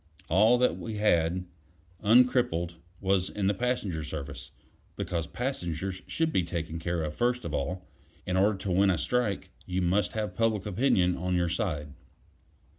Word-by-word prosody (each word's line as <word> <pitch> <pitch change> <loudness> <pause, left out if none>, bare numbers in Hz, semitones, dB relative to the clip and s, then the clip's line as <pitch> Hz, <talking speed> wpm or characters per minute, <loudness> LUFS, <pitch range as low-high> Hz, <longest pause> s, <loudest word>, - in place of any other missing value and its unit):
All 110 +8 +5
that 125 +1 +2
we 110 -2 -5
had, 90 -4 +2 0.6
uncrippled, 115 -6 +3 0.3
was 95 -1 +1
in 100 - -2
the 100 - +3
passenger 105 -8 -1
service, 75 -2 -6 0.5
because 85 -3 -2
passengers 95 - -3
should 160 -1 0
be 95 - +3
taken 85 -1 -4
care 85 0 -1
of 75 0 -4
first 125 +4 0
of 80 - -4
all. 90 +6 -2 0.4
In 90 - -1
order 100 +2 +3
to 95 0 -3
win 95 +2 +4
a 90 - +2
strike, 120 +1 -1 0.2
you 90 0 -1
must 90 +1 +1
have 110 -1 -2
public 110 -4 +1
opinion 95 -4 +2
on 90 +1 -1
your 85 -1 +1
side. 75 -8 -2
95 Hz, 160 wpm, -29 LUFS, 85-110 Hz, 0.6 s, All